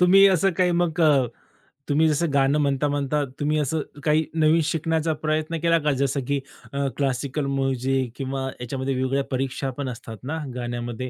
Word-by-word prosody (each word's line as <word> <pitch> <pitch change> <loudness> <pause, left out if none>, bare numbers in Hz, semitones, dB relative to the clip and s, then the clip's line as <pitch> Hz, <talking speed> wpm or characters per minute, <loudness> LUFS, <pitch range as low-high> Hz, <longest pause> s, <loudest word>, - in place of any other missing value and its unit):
तुम्ही 190 +2 +7
असं 190 0 +3
काही 180 +1 +2
मग 170 -1 0
अ, 145 -5 +5 0.6
तुम्ही 155 +2 +4
जसं 155 +3 +1
गाणं 140 +1 +3
म्हणता-म्हणता 145 0 +1 0.2
तुम्ही 150 +1 +1
असं 150 +2 0 0.2
काही 155 0 +3
नवीन 160 0 +4
शिकण्याचा 160 0 0
प्रयत्न 155 +1 -1
केला 165 0 +4
का? 150 -1 +1
जसं 140 0 0
की 140 0 +1 0.3
अ, 140 0 0
क्लासिकल 140 +1 -1
म्युझिक 135 -2 0
किंवा 135 -1 -3
याच्यामध्ये 130 +2 -2
वेगवेगळ्या 130 +2 0
परीक्षा 135 +1 -2
पण 140 -2 -2
असतात 115 -2 -8
ना 145 +5 -3 0.2
गाण्यामध्ये? 120 0 -4
140 Hz, 160 wpm, -24 LUFS, 135-160 Hz, 0.6 s, तुम्ही